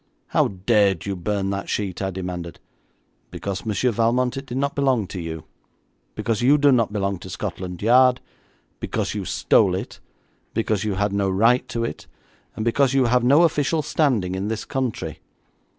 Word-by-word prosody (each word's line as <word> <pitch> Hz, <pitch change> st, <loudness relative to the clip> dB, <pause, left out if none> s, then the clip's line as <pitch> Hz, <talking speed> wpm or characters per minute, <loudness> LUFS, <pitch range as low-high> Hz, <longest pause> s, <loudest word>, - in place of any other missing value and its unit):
'How -, -, +3 dB
dared 100 Hz, -2 st, +1 dB
you 100 Hz, -1 st, -2 dB
burn 100 Hz, +2 st, -2 dB
that 100 Hz, 0 st, -4 dB
sheet?' 100 Hz, -3 st, -2 dB
I 95 Hz, -, -1 dB
demanded. 90 Hz, -2 st, -6 dB, 0.7 s
'Because, 100 Hz, +2 st, -5 dB
Monsieur 110 Hz, +4 st, +1 dB
Valmont, 120 Hz, +3 st, +1 dB
it 135 Hz, 0 st, -6 dB
did 125 Hz, -, -4 dB
not 140 Hz, +1 st, 0 dB
belong 130 Hz, -6 st, +1 dB
to 90 Hz, 0 st, -6 dB
you; 80 Hz, -1 st, -6 dB, 0.7 s
because 110 Hz, 0 st, -1 dB
you 135 Hz, +5 st, +5 dB
do 145 Hz, -1 st, +4 dB
not 115 Hz, -5 st, +2 dB
belong 100 Hz, -3 st, -2 dB
to -, -, -10 dB
Scotland 90 Hz, 0 st, -5 dB
Yard; 125 Hz, +2 st, +5 dB, 0.6 s
because -, -, -2 dB
you -, -, -4 dB
stole -, -, +3 dB
it; -, -, -6 dB, 0.6 s
because 110 Hz, -2 st, 0 dB
you 105 Hz, -3 st, -1 dB
had 100 Hz, +1 st, 0 dB
no 100 Hz, -1 st, +1 dB
right 115 Hz, +6 st, +3 dB
to 115 Hz, -, -2 dB
it; 115 Hz, -, -5 dB, 0.5 s
and 110 Hz, -, -3 dB
because 135 Hz, +3 st, +2 dB
you 135 Hz, -2 st, +4 dB
have 125 Hz, +1 st, +2 dB
no 140 Hz, +7 st, +5 dB
official 155 Hz, -1 st, +1 dB
standing 120 Hz, -, +1 dB
in 95 Hz, +2 st, -3 dB
this 110 Hz, 0 st, -3 dB
country. 125 Hz, -, -3 dB
110 Hz, 175 wpm, -23 LUFS, 95-125 Hz, 0.7 s, you